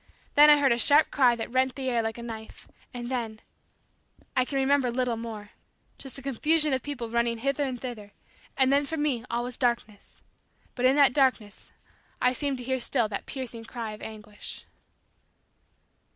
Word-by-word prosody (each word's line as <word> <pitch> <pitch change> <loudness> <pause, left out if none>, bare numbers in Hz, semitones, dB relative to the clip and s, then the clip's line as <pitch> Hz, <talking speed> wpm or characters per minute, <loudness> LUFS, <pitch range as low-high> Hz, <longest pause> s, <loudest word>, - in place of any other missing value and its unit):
Then 295 +1 +8
I 295 - +8
heard 280 -3 +3
a 235 - +2
sharp 290 +5 +5
cry 250 -4 +4
that 230 0 -6
rent 260 0 +1
the 265 -1 -4
air 240 -2 +1
like 225 0 -3
a 235 - -7
knife, 220 -2 -9 0.2
and 240 -2 -6
then 230 -4 -3 1.0
I 255 -1 +3
can 275 - -6
remember 270 -1 +2
little 245 -1 0
more 220 -2 -7 0.5
just 270 -1 -3
a 275 - -9
confusion 300 +3 +2
of 260 - 0
people 245 -6 -5
running 235 0 +1
hither 275 +4 -1
and 260 -3 -3
thither, 225 -5 -7 0.5
and 265 0 +4
then 285 0 +2
for 320 - -3
me 285 -6 0
all 235 +1 -1
was 245 0 -6
darkness, 235 -5 -2 0.5
but 250 - -1
in 260 +2 +5
that 280 -3 +5
darkness 255 -7 0 0.5
I 250 0 +3
seemed 280 0 -2
to 250 - -5
hear 260 +1 -1
still 235 -1 +1
that 200 - -5
piercing 240 -4 -6
cry 230 -2 -5
of 215 - -10
anguish. 210 -1 -9
250 Hz, 185 wpm, -27 LUFS, 230-275 Hz, 1.0 s, Then